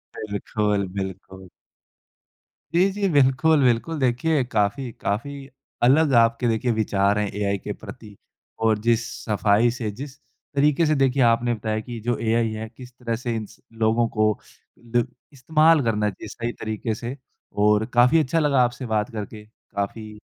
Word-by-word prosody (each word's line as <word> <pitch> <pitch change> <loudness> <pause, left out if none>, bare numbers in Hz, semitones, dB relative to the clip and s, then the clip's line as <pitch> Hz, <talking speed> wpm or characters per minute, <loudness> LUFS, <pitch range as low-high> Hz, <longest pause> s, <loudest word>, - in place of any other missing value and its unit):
बिल्कुल, 105 -1 -2
बिल्कुल। 95 0 -6 1.3
जी, 180 +3 +4
जी, 200 0 -1
बिल्कुल, 145 +1 +4
बिल्कुल। 125 +6 +1
देखिए 135 +3 +1
काफ़ी 115 +2 -1
काफ़ी 135 +7 -3 0.4
अलग 140 +4 +4
आपके 115 +1 +1
देखिए 115 +2 +1
विचार 105 -2 +1
हैं 105 - 0
एआई 100 0 -1
के 105 +2 -6
प्रति, 105 -3 -11 0.4
और 110 -1 +2
जिस 115 0 +3 0.2
सफ़ाई 105 +1 +3
से, 115 -2 -4
जिस 135 +5 -9 0.4
तरीके 150 +3 +3
से 155 0 +2
देखिए 135 -1 +2
आपने 120 +1 +3
बताया 110 -1 -2
कि 115 +1 -7
जो 120 -1 0
एआई 115 0 +1
है 110 +1 -5
किस 125 +2 -13
तरह 115 -2 -3
से 120 0 -3
इन 110 -1 -3
स - - -18 0.2
लोगों 115 +1 +3
को 110 0 +4 0.6
ल 120 - +5 0.3
इस्तेमाल 155 +4 +3
करना 105 -2 +1
चाहिए 95 - -9
सही 120 0 -4
तरीके 110 +1 -3
से 120 +4 -6 0.4
और 105 +1 +4
काफ़ी 125 +6 +5
अच्छा 155 +2 +1
लगा 145 -4 +3
आपसे 125 +2 -2
बात 110 -2 -1
करके। 105 -1 -7
काफ़ी 105 0 -7
115 Hz, 155 wpm, -23 LUFS, 105-130 Hz, 1.3 s, ल